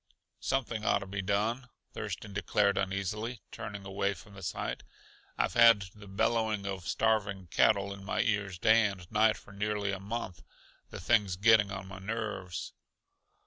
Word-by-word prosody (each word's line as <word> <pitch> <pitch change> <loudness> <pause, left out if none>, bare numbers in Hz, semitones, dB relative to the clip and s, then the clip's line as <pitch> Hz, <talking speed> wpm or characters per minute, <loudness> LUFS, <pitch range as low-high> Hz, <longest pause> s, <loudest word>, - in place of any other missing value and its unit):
"Something 120 -5 -1
ought - - +3
to - - -6
be 95 0 -4
done," 110 +6 -1 0.2
Thurston 105 -2 -5
declared 100 0 +2
uneasily, 100 +4 -2
turning 100 -1 -7
away 100 0 -1
from 100 - -14
the 95 - -11
sight. 90 - -3 0.6
"I've - - +1
had 115 -6 +6
the 105 -1 -13
bellowing 110 +1 0
of 95 -4 -4
starving 100 -3 0
cattle 100 -2 +3
in 100 0 -11
my 95 - 0
ears 100 -4 -1
day 110 +3 +5
and 95 -3 -7
night 110 0 +4
for - - -15
nearly 105 0 -1
a 100 - -3
month. 100 -2 -5 0.5
The - - -8
thing's 100 -5 +2
getting 105 +1 +5
on 95 -1 -5
my 95 -1 -9
nerves." 105 -4 -4
100 Hz, 160 wpm, -31 LUFS, 95-110 Hz, 0.6 s, had